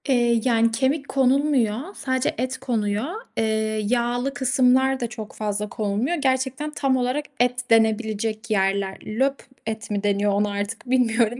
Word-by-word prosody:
Eee, 240 -3 +3
yani 230 -2 +3
kemik 270 +5 0
konulmuyor, 270 - +1
sadece 260 -2 -1
et 255 +2 -2
konuyor. 220 -4 -1 0.3
Eee, 220 -1 0
yağlı 245 +3 0
kısımlar 260 0 +3
da 240 - -1
çok 220 -2 -8
fazla 210 -1 -2
konulmuyor. 215 +11 -1
Gerçekten 265 0 -1
tam 270 -3 +1
olarak 255 +4 -1
et 245 0 +1
denebilecek 220 0 +1
yerler. 195 -1 +1
Löp 265 +6 0 0.3
et 220 -1 -5
mi 205 -1 -1
deniyor 205 0 +2
onu 205 +1 +1
artık 205 +4 -4
bilmiyorum 240 -2 +2
235 Hz, 140 wpm, -23 LUFS, 215-260 Hz, 0.3 s, Eee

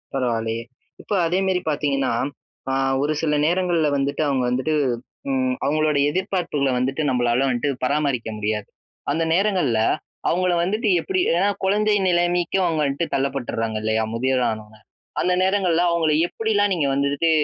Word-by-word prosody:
பரவாயில்லையே. 115 -3 -1 0.4
இப்ப - - -5
அதே 180 +3 +1
மாரி 185 -1 +1
பார்த்தீங்கன்னா 140 -4 0 0.6
அ - - 0 0.3
ஒரு 150 +1 +1
சில 150 -2 +1
நேரங்கள்ல 175 -2 +1
வந்துட்டு 140 +2 -1
அவங்க 135 -3 +1
வந்துட்டு 130 +5 0 0.6
ம் 130 -1 0
அவங்களோட 155 +1 +1
எதிர்பார்ப்புகள 175 -5 -1
வந்துட்டு 135 +4 -1
நம்பளால 125 0 +1
வந்துட்டு 125 +4 -1
பராமரிக்க 140 -4 0
முடியாது. 105 -1 -2 0.4
அந்த 165 - 0
நேரங்கள்ல 180 - +2 0.5
அவங்கள 180 +1 +1
வந்துட்டு 215 +5 -1
எப்படி 375 -1 -1 0.2
ஏன்னா 190 +4 +2 0.2
குழந்தை 210 +2 +2
நிலைமைக்கு 175 0 +1
அவங்க 160 -3 0
வந்துட்டு 140 +4 -1
தள்ளப்பட்டுறாங்க 125 -5 -2
இல்லையா? 110 0 +1
முதியவர் 130 +1 +1
ஆனோனே. 110 0 -9 0.4
அந்த 180 - +2
நேரங்கள்ல 185 -3 +2
அவங்கள 165 -2 +1 0.2
எப்படில்லாம் 205 0 0
நீங்க 155 -6 0
வந்துட்டு 140 +4 +1
150 Hz, 140 wpm, -22 LUFS, 130-180 Hz, 0.6 s, நேரங்கள்ல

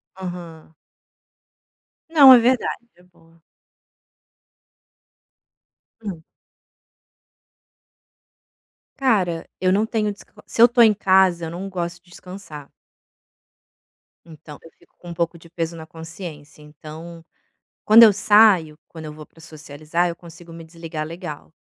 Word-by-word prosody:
Aham. 175 -4 -10 1.3
Não, 285 -5 +8
é - - +8
verdade. 240 0 -1
É 180 - -24
boa. 165 -2 -26 2.6
Hum. 185 -6 -7 2.8
Cara, 195 -11 0
eu 185 0 +1
não 210 +3 +1
tenho 220 -2 -2
desca 205 - -15 0.2
se - - -2
eu - - +10
estou 240 0 +2
em 220 -2 +5
casa, 190 -4 +2
eu - - -6
não 185 +3 -7
gosto 175 -1 -6
de 175 - -27
descansar. 180 -6 -12 1.5
Então, 155 -2 -13
eu 165 - -16
fico 175 - -28
com 175 - -13
um - - -6
pouco 170 0 -3
de 170 - -17
peso 170 0 -5
na 160 -1 -10
consciência, 160 -2 -11
então, 155 +3 -12 0.6
quando 225 +2 +8
eu 215 - +6
saio, 195 -7 +3
quando 160 -1 -12
eu 150 - -8
vou 155 0 -13
pra 165 - -22
socializar, 155 +2 -4
eu 170 - -5
consigo 170 0 -15
me 165 0 -11
desligar 160 -1 -7
legal. 160 -2 -9
170 Hz, 125 wpm, -21 LUFS, 160-190 Hz, 2.8 s, eu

